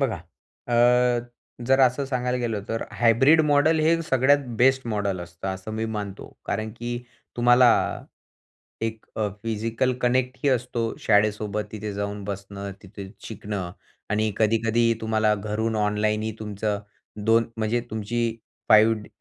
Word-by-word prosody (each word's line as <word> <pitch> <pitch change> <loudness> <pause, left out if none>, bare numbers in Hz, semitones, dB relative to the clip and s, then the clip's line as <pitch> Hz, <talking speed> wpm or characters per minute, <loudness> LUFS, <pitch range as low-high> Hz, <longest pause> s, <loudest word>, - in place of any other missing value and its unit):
बघा, 125 -7 0 0.5
अ, 120 - 0 0.9
जर 135 +1 +4
असं 130 +2 +3
सांगायला 125 -2 -1
गेलं 115 -4 -2
तर, 115 0 -2
हायब्रिड 135 +7 +5
मॉडेल 155 +3 +4
हे 165 +2 +3
सगळ्यात 135 -1 +3 0.2
बेस्ट 130 +1 +3
मॉडेल 100 -4 -1
असतं 85 +2 -7
असं 95 +3 -5
मी 110 +1 -2
मानतो. 100 -2 -6 0.2
कारण 110 0 -2
की 120 0 -3 0.4
तुम्हाला 120 0 +6 1.1
एक 115 -1 -3
अ, 105 -1 0
फिजिकल 115 +3 -1
कनेक्ट 125 +1 +1
ही 145 - +4
असतो 125 -2 -1 0.2
शाळेसोबत, 105 0 +1
तिथे 105 -1 -5
जाऊन 100 0 -4
बसणं, 100 0 -6
तिथे 95 0 -9 0.2
शिकणं 100 -4 -5 0.4
आणि 110 0 +1
कधी-कधी 115 +1 +2
तुम्हाला 110 -1 +2
घरून 110 +2 -2
ऑनलाईनही 105 +1 0
तुमचं 105 -1 -3 0.5
2 115 +1 +5
म्हणजे 110 +2 0
तुमची 115 +2 -2 0.3
5 110 +1 +6
ड - - -13
110 Hz, 135 wpm, -24 LUFS, 105-120 Hz, 1.1 s, तुम्हाला